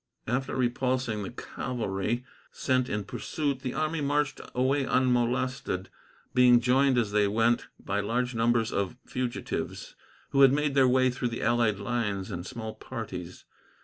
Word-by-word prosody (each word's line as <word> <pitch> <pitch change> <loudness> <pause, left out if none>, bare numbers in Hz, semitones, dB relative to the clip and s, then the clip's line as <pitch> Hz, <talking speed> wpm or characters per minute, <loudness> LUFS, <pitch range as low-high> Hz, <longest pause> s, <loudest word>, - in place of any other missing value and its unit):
After 125 +3 -1
repulsing 125 -2 0
the 95 - -4
cavalry 120 0 -3 0.3
sent 130 -1 0
in 105 0 -1
pursuit, 140 +6 -2
the 130 -2 -4
army 155 0 -1
marched 145 0 0
away 135 +3 +2
unmolested, 125 -4 0 0.4
being 125 -1 +6
joined 130 +2 +3
as 110 -4 +1
they 105 -1 +3
went 115 +3 +2
by 100 +1 -2
large 120 +5 -1
numbers 115 0 +2
of 100 +4 -2
fugitives, 125 -1 -4 0.4
who 140 - +3
had 135 -1 +8
made 150 0 +1
their 135 -2 +5
way 130 0 +4
through 125 0 -2
the 115 - -4
allied 115 -3 +2
lines 105 -3 -2
in 90 -2 -4
small 110 +2 -6
parties. 95 -8 -7
125 Hz, 150 wpm, -28 LUFS, 110-130 Hz, 0.4 s, had